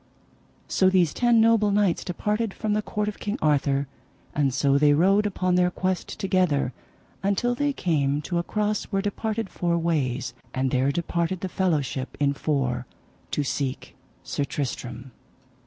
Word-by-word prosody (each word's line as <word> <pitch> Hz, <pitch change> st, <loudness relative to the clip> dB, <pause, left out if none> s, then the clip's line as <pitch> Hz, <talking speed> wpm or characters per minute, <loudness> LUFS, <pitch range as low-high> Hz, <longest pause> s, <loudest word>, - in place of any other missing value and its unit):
So 185 Hz, -, +3 dB
these 180 Hz, -4 st, +3 dB
ten 240 Hz, -2 st, +3 dB
noble 225 Hz, -2 st, +4 dB
knights 200 Hz, -3 st, +2 dB
departed 210 Hz, +3 st, -2 dB
from 215 Hz, -2 st, -1 dB
the 210 Hz, -, +1 dB
court 210 Hz, 0 st, -2 dB
of 210 Hz, -, -4 dB
King 205 Hz, +1 st, -2 dB
Arthur, 140 Hz, -2 st, +2 dB, 0.5 s
and 140 Hz, -2 st, +2 dB
so 140 Hz, +1 st, +2 dB
they 145 Hz, 0 st, +5 dB
rode 195 Hz, +7 st, +4 dB
upon 185 Hz, -2 st, 0 dB
their 180 Hz, 0 st, +4 dB
quest 185 Hz, 0 st, -3 dB
together 180 Hz, -9 st, +1 dB, 0.5 s
until 200 Hz, +5 st, +1 dB
they 290 Hz, +3 st, 0 dB
came 145 Hz, -, 0 dB
to 175 Hz, +2 st, -1 dB
a -, -, -1 dB
cross 210 Hz, +2 st, -1 dB
where 195 Hz, -1 st, -1 dB
departed 215 Hz, +1 st, -2 dB
four 170 Hz, -2 st, -1 dB
ways, 135 Hz, -7 st, -1 dB, 0.2 s
and 130 Hz, 0 st, 0 dB
there 130 Hz, +2 st, +2 dB
departed 170 Hz, +3 st, -1 dB
the 190 Hz, -, -3 dB
fellowship 150 Hz, -8 st, -1 dB
in 140 Hz, -1 st, +2 dB
four 130 Hz, -4 st, -1 dB, 0.4 s
to 145 Hz, -, -1 dB
seek 135 Hz, -1 st, -3 dB, 0.3 s
Sir 145 Hz, -, -2 dB
Tristram. 130 Hz, -2 st, -4 dB
170 Hz, 155 wpm, -25 LUFS, 140-205 Hz, 0.5 s, they